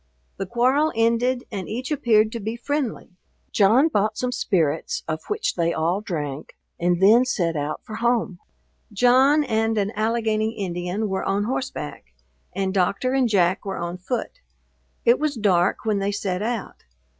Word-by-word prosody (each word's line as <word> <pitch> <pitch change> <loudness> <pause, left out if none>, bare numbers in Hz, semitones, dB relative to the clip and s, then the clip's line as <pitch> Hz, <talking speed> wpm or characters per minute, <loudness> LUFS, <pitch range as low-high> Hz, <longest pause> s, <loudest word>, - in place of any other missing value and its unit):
The 195 - -4
quarrel 260 +8 +2
ended, 235 +2 +1
and 195 -4 -5
each 255 +6 -4
appeared 220 -6 +3
to 235 - -4
be 220 +2 -4
friendly. 270 -3 -3 0.4
John 225 +9 +4
bought 215 -8 0
some 250 0 -1
spirits, 160 -10 0
of 160 0 -3
which 420 +1 -1
they 170 -1 0
all 170 +5 0
drank, 150 -8 -5 0.2
and 175 0 +1
then 215 +6 +6
set 175 -10 -1
out 150 +1 -3
for 215 - -7
home. 230 -6 0 0.5
John 260 +7 +4
and 225 -3 0
an 205 0 0
Allegany 220 0 0
Indian 180 +2 -2
were 190 -1 -2
on 200 +1 0
horseback, 150 - -5 0.4
and 190 0 -2
Doctor 200 +7 +1
and 260 -3 +2
Jack 185 -1 +2
were 195 -2 -4
on 175 +1 -4
foot. 230 +6 -4 0.7
It 235 +1 +5
was 300 -2 -1
dark 195 -4 +1
when 215 -2 +1
they 195 +1 -1
set 195 -2 -2
out. 230 0 -4
215 Hz, 160 wpm, -23 LUFS, 185-240 Hz, 0.7 s, then